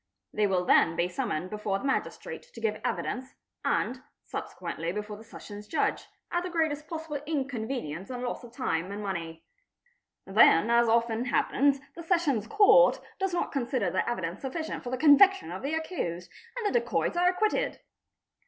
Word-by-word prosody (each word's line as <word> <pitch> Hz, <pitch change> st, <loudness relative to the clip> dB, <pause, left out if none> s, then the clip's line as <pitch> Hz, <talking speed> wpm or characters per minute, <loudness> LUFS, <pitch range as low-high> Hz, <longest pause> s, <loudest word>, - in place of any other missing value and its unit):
They 210 Hz, -1 st, +2 dB
will 185 Hz, -2 st, +1 dB
then 165 Hz, -1 st, +4 dB
be 170 Hz, +1 st, +1 dB
summoned 175 Hz, -1 st, -3 dB
before 210 Hz, -2 st, -1 dB
the 230 Hz, -, -7 dB
magistrate 270 Hz, -, -2 dB
to -, -, -8 dB
give 445 Hz, -, -1 dB
evidence, 260 Hz, +1 st, -3 dB, 0.3 s
and -, -, 0 dB, 0.2 s
subsequently 165 Hz, +1 st, -5 dB
before 210 Hz, +2 st, -5 dB
the 215 Hz, -, -12 dB
Sessions 210 Hz, -2 st, -10 dB
Judge, 320 Hz, -, 0 dB, 0.2 s
at 350 Hz, -, +1 dB
the 365 Hz, -, -4 dB
greatest 315 Hz, -3 st, -1 dB
possible 320 Hz, -3 st, -5 dB
inconvenience 245 Hz, -, -3 dB
and 250 Hz, -1 st, -5 dB
loss 245 Hz, 0 st, -4 dB
of 240 Hz, -, -11 dB
time 185 Hz, -, -2 dB
and 205 Hz, +1 st, -5 dB
money. 165 Hz, -4 st, -5 dB, 0.8 s
Then, 195 Hz, 0 st, +5 dB
as 235 Hz, -1 st, +4 dB
often 230 Hz, +1 st, +2 dB
happens, 275 Hz, +2 st, +2 dB
the 335 Hz, -, -7 dB
Sessions 320 Hz, -, +1 dB
Court 425 Hz, -, +6 dB, 0.2 s
does 385 Hz, -1 st, 0 dB
not 350 Hz, -, -1 dB
consider 245 Hz, -, -1 dB
their -, -, 0 dB
evidence 185 Hz, -6 st, -3 dB
sufficient 315 Hz, +4 st, -4 dB
for 245 Hz, -, -5 dB
the 255 Hz, -, -2 dB
conviction 375 Hz, +8 st, +6 dB
of -, -, -5 dB
the 285 Hz, +4 st, -1 dB
accused, 180 Hz, -, -4 dB, 0.3 s
and 475 Hz, -, -3 dB
the 415 Hz, +4 st, +3 dB
dacoits -, -, -1 dB
are 355 Hz, +1 st, +4 dB
acquitted. 430 Hz, +6 st, 0 dB
245 Hz, 170 wpm, -28 LUFS, 200-320 Hz, 0.8 s, Court